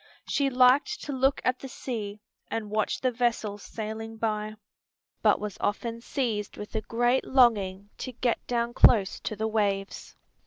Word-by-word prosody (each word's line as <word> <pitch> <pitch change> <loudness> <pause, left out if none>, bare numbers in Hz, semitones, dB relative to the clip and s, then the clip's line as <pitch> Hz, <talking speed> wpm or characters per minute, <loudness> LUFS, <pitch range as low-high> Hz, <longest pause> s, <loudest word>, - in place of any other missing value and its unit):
She 280 -1 +1
liked 265 +11 +4
to 290 - -4
look 270 +1 +1
at 255 0 +1
the 270 - -7
sea 215 -5 -5 0.3
and 215 -2 -4
watch 215 0 0
the 255 - +2
vessels 225 -4 -1
sailing 225 +1 -6
by, 215 -1 -2 0.7
but - - +4
was 210 -2 -6
often 230 +2 -2
seized 230 -6 -2
with 210 - -8
a 220 - 0
great 240 +3 +1
longing 205 -6 +2
to 255 - -4
get 240 0 -1
down 235 -1 -1
close 210 -6 +5
to 215 - -4
the 220 +2 -1
waves. 200 -3 -1
225 Hz, 160 wpm, -27 LUFS, 210-250 Hz, 0.7 s, close